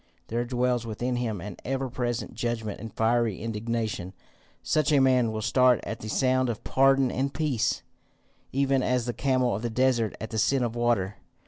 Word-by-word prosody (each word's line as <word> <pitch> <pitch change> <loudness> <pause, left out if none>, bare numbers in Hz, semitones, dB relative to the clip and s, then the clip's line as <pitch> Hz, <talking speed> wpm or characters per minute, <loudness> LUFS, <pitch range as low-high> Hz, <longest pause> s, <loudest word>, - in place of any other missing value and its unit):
There 120 +2 -1
dwells 125 -1 0
within 120 +2 -2
him 115 -5 -2
an 100 -1 -7
ever 135 +1 -2
present 120 -1 -3
judgment 115 -3 -3
and 115 -1 -7
fiery 115 -2 +1
indignation. 110 -4 -3 0.5
Such 155 -1 +1
a 145 - +5
man 130 -3 +3
will 110 0 -4
start 125 +1 +4
at 110 - -5
the 110 - -7
sound 130 +2 +2
of 115 - -4
pardon 135 -1 +3
and 135 +2 -1
peace, 135 -8 0 0.7
even 135 0 +2
as 125 -2 +1
the 120 - -2
camel 130 -2 +1
of 100 - -3
the 120 - -2
desert 120 -2 +1
at 110 - -6
the 110 - -1
scent 135 +4 +2
of 115 0 -4
water. 115 -5 0
120 Hz, 185 wpm, -27 LUFS, 110-130 Hz, 0.7 s, a